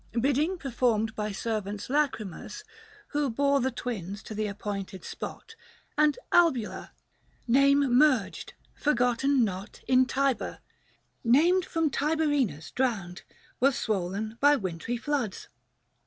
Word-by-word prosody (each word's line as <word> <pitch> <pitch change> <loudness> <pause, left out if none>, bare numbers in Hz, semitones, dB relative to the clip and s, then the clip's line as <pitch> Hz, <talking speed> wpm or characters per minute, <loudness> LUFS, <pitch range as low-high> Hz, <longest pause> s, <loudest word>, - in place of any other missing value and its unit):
Bidding 285 +8 +1
performed 235 -6 0
by 210 0 -2
servants 210 -1 -3
lachrymous, 280 - -2 0.5
Who 290 -2 0
bore 280 +4 +2
the 260 - +1
twins 210 -6 -5
to - - -8
the 215 0 -1
appointed 200 -2 -5
spot 450 - -7 0.4
400 300 - +3
And 300 +8 +2
Albula, 295 -11 +2 0.3
— - - -37
name 275 +3 +5 0.2
merged, 290 -8 +2 0.2
forgotten 250 0 +2
not 195 0 -4
In 255 0 +4
Tiber, 275 -1 0 0.7
named 335 +10 +4
from 325 -4 0
Tiberinus 290 - 0
drowned, 200 -9 -2 0.2
— - - -30
Was 270 +1 +3
swollen 210 +2 -2
by 290 +1 +6
wintry 190 - -3
floods. 255 -6 -3
245 Hz, 125 wpm, -28 LUFS, 210-285 Hz, 0.7 s, by